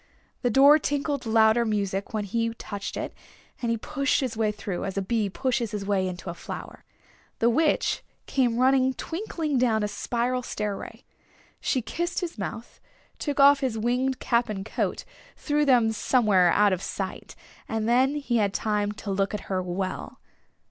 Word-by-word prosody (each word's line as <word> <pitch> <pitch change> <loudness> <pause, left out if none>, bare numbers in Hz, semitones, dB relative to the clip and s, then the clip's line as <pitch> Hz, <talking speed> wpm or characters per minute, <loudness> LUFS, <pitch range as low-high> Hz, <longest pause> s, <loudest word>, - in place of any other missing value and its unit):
The 245 - +1
door 280 +6 +7
tinkled 285 -2 -2
louder 220 +1 +4
music 200 -3 -1
when 215 -1 -1
he 230 +3 -1
touched 205 -3 -6
it, - - -4 0.5
and 235 - -1
he 230 - +1
pushed 280 +4 0
his 255 -5 -2
way 215 -1 +1
through, 205 -3 -5
as 195 0 -4
a - - +2
bee 215 0 0
pushes 245 +1 -1
his 205 -1 -4
way 195 -2 +1
into 180 -1 -5
a - - -7
flower. - - -8 0.5
The 235 +1 +3
Witch 310 +5 +1 0.2
came 245 -4 +1
running 260 +1 +3
twinklingly 325 - -2
down 225 -4 +2
a - - +1
spiral 245 +4 -1
stairway. 210 -4 -5 0.6
She 255 - 0
kissed 345 - -2
his 340 -10 -5
mouth, 225 +4 -6 0.4
took 290 -1 -3
off 280 0 +7
his 255 -5 -1
winged 250 +4 0
cap 235 -1 +1
and 195 -2 -4
coat, - - -2 0.3
threw 295 0 +1
them 240 -5 +4
somewhere 210 -6 +3
out 205 +1 +4
of 185 - -2
sight, 195 -1 -5 0.3
and 220 0 -1
then 260 +4 +3
he 275 -5 0
had 200 -3 +1
time 210 -1 0
to 205 -1 -6
look 195 +1 0
at 205 - -4
her 185 -1 +1
well. 185 +1 -4
230 Hz, 175 wpm, -26 LUFS, 205-265 Hz, 0.6 s, door